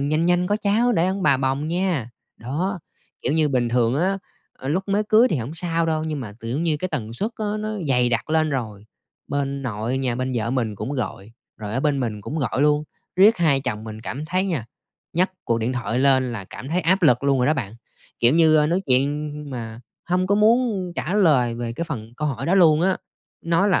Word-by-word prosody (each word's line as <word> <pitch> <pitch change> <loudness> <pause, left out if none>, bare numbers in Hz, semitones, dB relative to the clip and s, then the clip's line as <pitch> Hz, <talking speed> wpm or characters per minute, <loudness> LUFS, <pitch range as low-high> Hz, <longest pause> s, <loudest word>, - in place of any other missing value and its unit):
nhanh 155 +4 +1
nhanh 180 0 +2
có 205 - +1
cháu 215 +4 +2
để 170 -5 +2
ông 190 +1 -2
bà 140 -4 +4
bồng 135 +3 -1
nha." 170 - -1 0.3
Đó! 170 - -3 0.4
Kiểu - - 0
như 155 -1 +2
bình 125 -3 +1
thường 120 0 +2
á, 185 +6 +1 0.3
ờ, 130 - -8
lúc 180 +7 0
mới 200 +2 +2
cưới 220 +4 +5
thì - - +1
hổng 130 +4 -4
sao 165 -1 0
đâu, 155 -1 0
nhưng 155 -3 -3
mà 110 -5 -7
tự 115 +3 -3
nhiên 160 -1 0
cái 185 - -2
tần 115 -10 -4
suất 205 - -2
á 215 - -3
nó 215 - -3 0.2
dày 125 -2 +3
đặc 120 +5 -1
lên 155 -1 +2
rồi, 110 -7 -4 0.4
bên 140 -1 -2
nội 120 +1 -2
nhà 130 -3 -1
bên 130 +1 -2
vợ 115 0 -1
mình 120 -5 -1
cũng 105 +7 -4
gọi, 110 -5 -4 0.3
rồi 105 -1 -6
ở 130 - 0
bên 145 -1 +1
mình 110 -4 -3
cũng 145 +10 -5
gọi 135 -1 0
luôn. 150 0 +3 0.3
Riết 205 +5 +6
hai 160 -5 +3
vợ - - -5
chồng 105 +1 -3
mình 110 -1 -8
cảm 135 +6 -5
thấy 185 +4 0
nha, 155 - -2 0.5
nhấc 180 +4 +2
cuộc 115 - +1
điện 115 +3 -1
thoại 125 -1 -2
lên 130 -2 +3
là 105 -4 -5
cảm 125 +7 -9
thấy 175 +4 +1
áp 185 +3 +2
lực 125 -6 +4
luôn 140 -1 +3
rồi 125 - +2
đó 155 - +3
bạn. 110 -7 -4 0.5
Kiểu 120 +4 +4
như, 160 -1 +5
a, 150 - +4
nói 175 +5 0
chuyện 145 +3 +1 0.2
mà 115 -3 -6 0.2
hông 180 +1 0
có 200 - +2
muốn 215 -4 +2
trả 180 - -2
lời 145 - +3
về 120 0 -4
cái 170 +8 -3
phần 115 -6 -6
câu 150 +1 -1
hỏi 125 -5 -4
đó 175 - +3
luôn 160 -5 +5
á, 190 +1 +2 0.5
nói 170 +4 +2
là: 185 - +3
145 Hz, 235 wpm, -23 LUFS, 120-175 Hz, 0.5 s, Riết